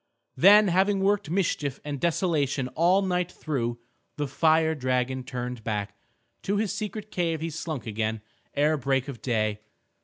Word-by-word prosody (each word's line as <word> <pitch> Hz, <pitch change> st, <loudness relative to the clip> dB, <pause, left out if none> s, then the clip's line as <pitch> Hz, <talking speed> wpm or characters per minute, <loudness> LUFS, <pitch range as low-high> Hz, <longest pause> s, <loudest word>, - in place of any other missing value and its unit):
Then 205 Hz, +2 st, +7 dB
having 190 Hz, +2 st, +2 dB
worked 200 Hz, -2 st, +1 dB
mischief 160 Hz, -6 st, -1 dB
and 145 Hz, -2 st, -4 dB
desolation 150 Hz, -6 st, 0 dB
all 180 Hz, +7 st, +3 dB
night 180 Hz, -1 st, 0 dB
through, 120 Hz, -9 st, -3 dB, 0.4 s
the 145 Hz, -1 st, -1 dB
fire 160 Hz, +3 st, +3 dB
dragon 130 Hz, -2 st, -1 dB
turned 125 Hz, -2 st, -5 dB
back; 105 Hz, -2 st, -3 dB, 0.5 s
to 200 Hz, +1 st, -1 dB
his 210 Hz, -2 st, 0 dB
secret 215 Hz, 0 st, -5 dB
cave 165 Hz, -3 st, -1 dB
he 165 Hz, +1 st, -3 dB
slunk 155 Hz, -5 st, -5 dB
again 110 Hz, 0 st, -2 dB, 0.3 s
ere 150 Hz, +2 st, +3 dB
break 135 Hz, 0 st, 0 dB
of 135 Hz, -5 st, -7 dB
day. 110 Hz, -4 st, 0 dB
150 Hz, 150 wpm, -26 LUFS, 125-180 Hz, 0.5 s, Then